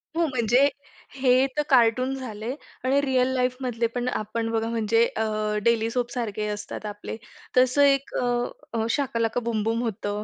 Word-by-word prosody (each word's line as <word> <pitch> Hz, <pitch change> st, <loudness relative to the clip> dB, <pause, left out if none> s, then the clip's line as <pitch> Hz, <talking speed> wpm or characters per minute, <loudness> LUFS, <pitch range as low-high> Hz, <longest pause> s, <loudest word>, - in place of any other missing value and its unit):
हो, 335 Hz, -, +2 dB
म्हणजे 250 Hz, +1 st, +3 dB, 0.5 s
हे 260 Hz, 0 st, +4 dB
तर -, -, +4 dB
कार्टून 255 Hz, +1 st, +4 dB
झाले 230 Hz, -2 st, -5 dB, 0.3 s
आणि 265 Hz, +2 st, +3 dB
रिअल 260 Hz, -2 st, +2 dB
लाईफमधले 250 Hz, -2 st, 0 dB
पण 245 Hz, 0 st, -1 dB
आपण 225 Hz, 0 st, -2 dB
बघा 225 Hz, 0 st, 0 dB
म्हणजे 230 Hz, 0 st, +2 dB
अ, 220 Hz, -, -2 dB, 0.4 s
डेली 230 Hz, -1 st, +2 dB
सोपसारखे 235 Hz, -4 st, -2 dB
असतात 210 Hz, +1 st, -5 dB
आपले, 210 Hz, 0 st, -6 dB, 0.4 s
तसं 255 Hz, +2 st, +4 dB
एक 275 Hz, -1 st, +3 dB
अ, -, -, 0 dB, 0.5 s
अ, 225 Hz, -1 st, 0 dB
शाका 265 Hz, -2 st, 0 dB
लाका 230 Hz, +1 st, +1 dB
बूम 225 Hz, -2 st, -1 dB
बूम 225 Hz, +2 st, 0 dB
होतं. 210 Hz, -2 st, -3 dB
235 Hz, 160 wpm, -25 LUFS, 225-255 Hz, 0.5 s, हे